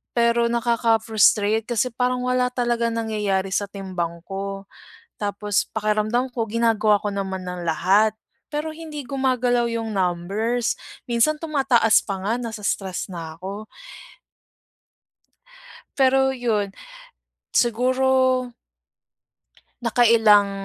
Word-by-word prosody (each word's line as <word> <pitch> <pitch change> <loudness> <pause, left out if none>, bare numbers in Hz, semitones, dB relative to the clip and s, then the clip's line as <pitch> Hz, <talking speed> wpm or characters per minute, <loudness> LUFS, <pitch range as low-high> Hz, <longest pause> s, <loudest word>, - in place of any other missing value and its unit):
pero 235 0 +3
nakaka-frustrate 225 -2 +2
kasi 245 +1 0
parang 250 0 0
wala 250 0 +1
talagang 240 -2 0
nangyayari 210 -4 -1
sa 205 - 0
timbang 180 -4 -4
ko. 195 0 -5 0.5
Tapos 205 -1 -1
pakiramdam 215 +4 0
ko 235 -2 -1
ginagawa 220 -1 +2
ko 210 - -3
naman 190 -2 -4
ang 180 -1 -5
lahat, 200 +7 +3 0.4
pero 300 +1 -3
hindi 310 -2 -7
gumagalaw 250 -3 +1
yung 225 -1 -3
numbers. 195 +7 0 0.3
Minsan, 240 +6 +2
tumataas 270 -8 +3
pa 195 -2 -4
nga, 205 +3 0
nase-stress 210 -5 -3
na 165 -3 -7
ako. 200 +4 -7 2.3
Pero 265 0 +4
'yun, 220 -6 -1 0.8
siguro 255 +1 +2 1.3
nakailang, 225 -4 +5
225 Hz, 100 wpm, -23 LUFS, 200-245 Hz, 2.3 s, nakailang